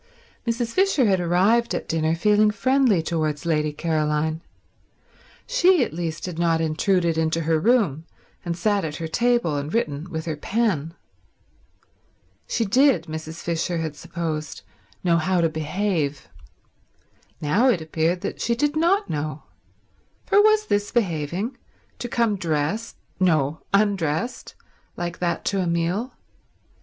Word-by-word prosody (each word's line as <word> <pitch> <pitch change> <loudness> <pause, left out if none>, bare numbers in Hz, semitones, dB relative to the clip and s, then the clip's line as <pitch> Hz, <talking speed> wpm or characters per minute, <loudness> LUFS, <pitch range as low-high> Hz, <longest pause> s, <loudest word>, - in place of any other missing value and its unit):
Mrs. 230 0 -1
Fisher 380 -9 +3
had 195 -3 +3
arrived 190 +7 +2
at - - -4
dinner 160 0 0
feeling 210 +4 +4
friendly 235 -3 +2
towards 155 -3 -2
Lady 150 -2 +1
Caroline. 155 0 -1 1.0
She 375 - +4
at - - -4
least 165 -1 -4
had 175 -3 -6
not 165 -1 +2
intruded 165 +1 +1
into 160 +1 0
her 160 0 +1
room 175 - +2 0.4
and 170 -1 -3
sat 205 +2 +1
at 155 -2 -4
her 165 0 -4
table 235 -5 +1
and 145 +2 -4
written 155 -6 -2
with 160 -2 -4
her 160 -2 -2
pen. 170 -3 -1 1.5
She 230 - 0
did, 250 - +4
Mrs. 160 +1 -7
Fisher 170 +1 -1
had 160 -2 -3
supposed, 160 -2 -5 0.4
know 170 -2 +3
how 180 +2 +1
to 165 -1 +3
behave. 155 -2 -2 1.1
Now 195 - +3
it 200 - +2
appeared 160 +2 -1
that - - -5
she 235 - +1
did 295 +4 0
not 365 +6 +2
know, 150 0 -4 0.8
for 405 - +5
was 430 0 +4
this 205 - 0
behaving, 190 - -1 0.4
to 240 - -4
come 230 -3 +1
dressed—no, 160 -2 -1
undressed—like 190 -2 -2
that 175 -1 -1
to 200 - 0
a 180 - -1
meal? 170 +8 -1
170 Hz, 135 wpm, -23 LUFS, 160-220 Hz, 1.5 s, for